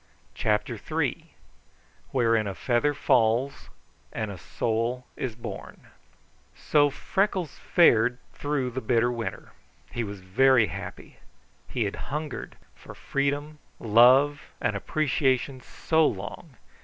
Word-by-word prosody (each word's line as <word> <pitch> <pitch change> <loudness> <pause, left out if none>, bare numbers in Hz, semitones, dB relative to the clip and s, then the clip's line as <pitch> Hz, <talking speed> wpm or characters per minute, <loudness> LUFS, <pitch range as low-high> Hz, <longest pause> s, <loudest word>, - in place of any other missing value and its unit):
CHAPTER 105 -1 -1
III - - -2 0.8
Wherein 115 -4 +2
a 100 - -4
Feather 135 +7 +1
Falls 125 0 +1 0.4
and 110 -2 -3
a 95 - -8
Soul 115 +6 -2
Is 125 -4 -4
Born 115 - -9 0.7
So 145 -1 +3
Freckles 190 +1 -1
fared 125 -8 +4 0.2
through 145 -3 -2
the 130 +2 -4
bitter 120 -1 +2
winter. 115 -1 -5 0.4
He 120 - -2
was 100 -2 -7
very 120 +6 +4
happy. - - -8 0.5
He - - -1
had - - -3
hungered 150 +1 -5 0.2
for - - -13
freedom, 145 +2 -2 0.2
love, 130 +6 +5 0.2
and - - 0
appreciation 135 -3 0
so 160 +3 +1
long! 110 - -6
125 Hz, 115 wpm, -26 LUFS, 115-145 Hz, 0.8 s, love